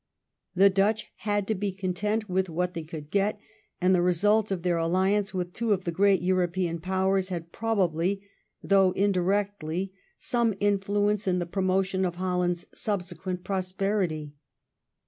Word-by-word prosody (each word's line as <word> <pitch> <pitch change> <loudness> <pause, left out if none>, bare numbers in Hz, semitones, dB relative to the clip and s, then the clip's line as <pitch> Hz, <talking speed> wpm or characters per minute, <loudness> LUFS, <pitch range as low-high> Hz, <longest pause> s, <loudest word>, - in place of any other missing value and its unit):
The 195 +2 +6
Dutch 205 +3 +1
had 205 -2 -1
to 220 - +1
be 205 0 -2
content 200 +3 -2
with 185 0 0
what 180 +2 -1
they 165 - -4
could 155 -2 -9
get, 205 +1 +1 0.4
and 185 +1 +3
the 180 - +4
result 205 +5 +3
of 185 -3 -2
their 175 -2 +1
aUiance 190 +5 +1
with 180 -2 -3
two 230 -2 +1
of 190 -2 -2
the 170 - 0
great 195 +1 +3
European 180 -2 0
Powers 190 +2 0
had 170 -2 -5
probably, 195 -3 0 0.4
although 195 -2 +4
indirectly, 195 -2 0 0.2
some 235 -4 0
influence 205 +1 +1
in 180 -1 +2
the 175 - -1
promotion 190 +1 0
of 175 -2 -1
Holland's 180 -1 -1
subsequent 180 -2 -3
prosperity. 185 -5 -1
190 Hz, 145 wpm, -27 LUFS, 180-200 Hz, 0.4 s, The